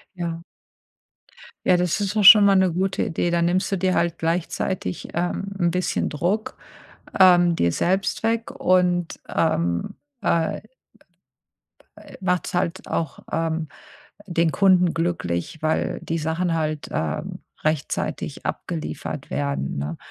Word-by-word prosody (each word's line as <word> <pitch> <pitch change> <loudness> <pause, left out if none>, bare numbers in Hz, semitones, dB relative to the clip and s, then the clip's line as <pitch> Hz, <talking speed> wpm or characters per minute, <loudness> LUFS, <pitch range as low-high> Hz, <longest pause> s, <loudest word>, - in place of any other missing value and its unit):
Ja. 170 -2 -4 1.2
Ja, 180 - +5
das 180 +3 0
ist 200 +1 -2
doch 210 - +3
schon 210 +1 +11
mal 200 -1 +5
'ne 190 -2 +3
gute 190 +2 0
Idee. 170 +1 -1
Dann 170 0 +2
nimmst 180 +3 0
du 195 - +1
dir 185 +1 +1
halt 170 -1 0
gleichzeitig, 165 - -2
ähm, 175 +3 -2
'n 175 -2 +1
bisschen 180 +1 -1
Druck 180 +9 -2 0.6
ähm, 175 -2 +6
dir 85 - +1
selbst 190 - 0
weg 230 +3 0
und, 180 - +1
ähm, 85 - 0 0.3
äh 165 -4 +1 1.4
äh, - - -13
machst 180 -2 -1
halt 175 -1 -2
auch, 160 -4 -3
ähm, 160 0 -1 0.6
den 170 -3 +1
Kunden 185 -3 +4
glücklich, 160 - -2
weil 155 0 0
die 165 - -2
Sachen 165 +2 -1
halt, 155 -2 -2
ähm, 75 -2 -3 0.2
rechtzeitig 155 -2 -2
abgeliefert 75 -1 -5
werden, 70 0 -2
ne? 75 +3 -4
170 Hz, 130 wpm, -23 LUFS, 160-185 Hz, 1.4 s, schon